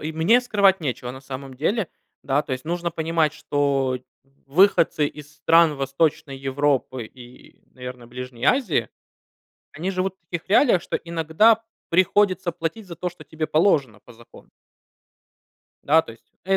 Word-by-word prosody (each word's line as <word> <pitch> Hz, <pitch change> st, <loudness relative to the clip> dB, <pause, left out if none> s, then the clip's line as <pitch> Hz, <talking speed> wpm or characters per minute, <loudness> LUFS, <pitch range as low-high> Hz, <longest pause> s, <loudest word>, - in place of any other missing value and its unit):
и 155 Hz, +1 st, -4 dB
мне 170 Hz, +10 st, +4 dB
скрывать 200 Hz, -6 st, +3 dB
нечего, 125 Hz, -4 st, -3 dB
на 130 Hz, +1 st, -10 dB
самом 135 Hz, 0 st, -8 dB
деле. 185 Hz, -, -1 dB, 0.3 s
Да, 140 Hz, +1 st, +1 dB
то 145 Hz, -, -6 dB
есть 130 Hz, 0 st, -4 dB
нужно 170 Hz, +1 st, -2 dB
понимать, 160 Hz, -1 st, 0 dB
что 140 Hz, -3 st, 0 dB, 0.5 s
выходцы 160 Hz, -1 st, +3 dB
из 150 Hz, 0 st, -10 dB
стран 165 Hz, 0 st, +4 dB
Восточной 140 Hz, +1 st, -1 dB
Европы 135 Hz, -2 st, -1 dB
и, 125 Hz, +2 st, -15 dB
наверно, 125 Hz, -1 st, -9 dB
Ближней 125 Hz, 0 st, -7 dB
Азии, 180 Hz, -, +2 dB, 0.8 s
они 175 Hz, +6 st, -3 dB
живут 190 Hz, 0 st, -2 dB
в -, -, -64 dB
таких 170 Hz, -2 st, -5 dB
реалиях, 215 Hz, -3 st, +4 dB
что -, -, -2 dB
иногда 170 Hz, +7 st, +2 dB, 0.3 s
приходится 185 Hz, 0 st, +2 dB
платить 170 Hz, +5 st, -5 dB
за 170 Hz, -, -8 dB
то, 180 Hz, -, -2 dB
что 170 Hz, -3 st, -14 dB
тебе 155 Hz, +1 st, -4 dB
положено 145 Hz, -, +2 dB
по 120 Hz, -, -14 dB
закону. 115 Hz, +1 st, -17 dB, 1.4 s
Да, 160 Hz, +3 st, +5 dB
то 115 Hz, -, -11 dB
есть, 115 Hz, -, -20 dB, 0.2 s
э, 195 Hz, 0 st, +2 dB
155 Hz, 150 wpm, -23 LUFS, 135-175 Hz, 1.4 s, Да